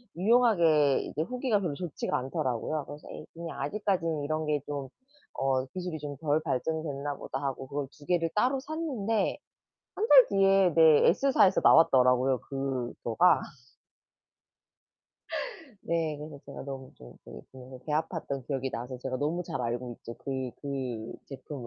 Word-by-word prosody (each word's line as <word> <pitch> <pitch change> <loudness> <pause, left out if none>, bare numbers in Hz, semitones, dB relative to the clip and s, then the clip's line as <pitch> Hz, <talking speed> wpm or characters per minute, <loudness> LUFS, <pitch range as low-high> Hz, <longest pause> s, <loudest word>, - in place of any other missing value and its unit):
유용하게 170 - +4
이제 150 - -4
후기가 250 0 0
별로 175 -7 -2
좋지가 170 0 -3
않더라고요. 130 +3 -2
그래서 145 +1 -10
'에이 - - -8
그냥 170 0 -7
아직까지는 175 -7 -1
이런 155 +2 -1
게 150 -1 +1
좀 140 -2 -4 0.5
어 135 -1 +1
기술이 180 +2 -5
좀 145 -1 -6
덜 150 0 +1
발전이 155 +2 -1
됐나 145 -1 -4
보다.' 135 - -5
하고 135 -1 -3
그걸 140 0 -3
2 145 - -17
개를 165 -1 +1
따로 255 +5 +2
샀는데 260 -10 -1 0.6
1 440 +4 -1
달 - - +9
뒤에 195 -2 +4
네. 160 -2 +6
에스사에서 260 -2 +4
나왔더라고요 130 -4 +5
그거가. 135 +3 +1 2.5
네. 165 -2 0
그래서 150 -1 -8
제가 - - -8
너무 135 -1 -7
좀 60 - -13
그 - - -10
그래서 130 0 -11
배 150 - -2
아팠던 150 -4 -2
기억이 135 -2 -2
나서 125 +1 -5
제가 130 0 -3
너무 155 +6 -1
잘 135 - -4
알고 120 +1 -3
있죠, 115 - -9
그 140 - -7 0.3
그 130 -6 -4
제품을. 135 -1 -8
150 Hz, 315 characters per minute, -29 LUFS, 135-175 Hz, 2.5 s, 달